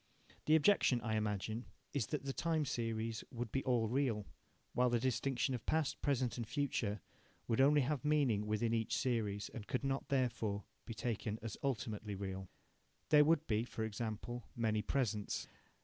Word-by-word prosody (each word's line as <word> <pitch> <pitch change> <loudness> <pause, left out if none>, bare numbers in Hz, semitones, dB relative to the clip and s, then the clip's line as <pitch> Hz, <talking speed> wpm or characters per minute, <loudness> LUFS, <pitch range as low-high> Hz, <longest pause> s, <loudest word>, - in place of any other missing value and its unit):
The 155 - +7
objection, 155 -6 +5
I 110 0 -1
imagine, 110 +2 -1 0.3
is 125 -8 0
that 150 -2 -3
the 135 - -1
time 160 -1 +1
series 115 -3 -2
would 120 -3 -4
be 135 - 0
all 120 -4 +2
real, 120 -4 +1 0.5
while 125 +1 +3
the 120 -1 +2
distinction 130 +1 0
of 120 -3 -3
past, 160 -3 +1
present, 130 -4 +1
and 115 -2 -3
future 115 - -1 0.5
would 115 +3 +3
only 145 +2 +6
have 135 0 0
meaning 135 -9 +2
within 115 +2 +1
each 115 -1 +1
series, 105 -5 0
and 110 -3 -8
could 125 - -1
not, 135 0 -1
therefore, 115 -6 0 0.2
be 115 - -6
taken 110 -2 -2
as 115 -2 -4
ultimately 110 -6 -2
real. 95 -1 -5 0.6
There 150 -1 +8
would 160 0 +3
be, 110 -3 +1
for 115 -2 -4
example, 110 +1 -4
many 110 -2 +1
presents. 110 -5 -1
120 Hz, 165 wpm, -37 LUFS, 110-135 Hz, 0.6 s, There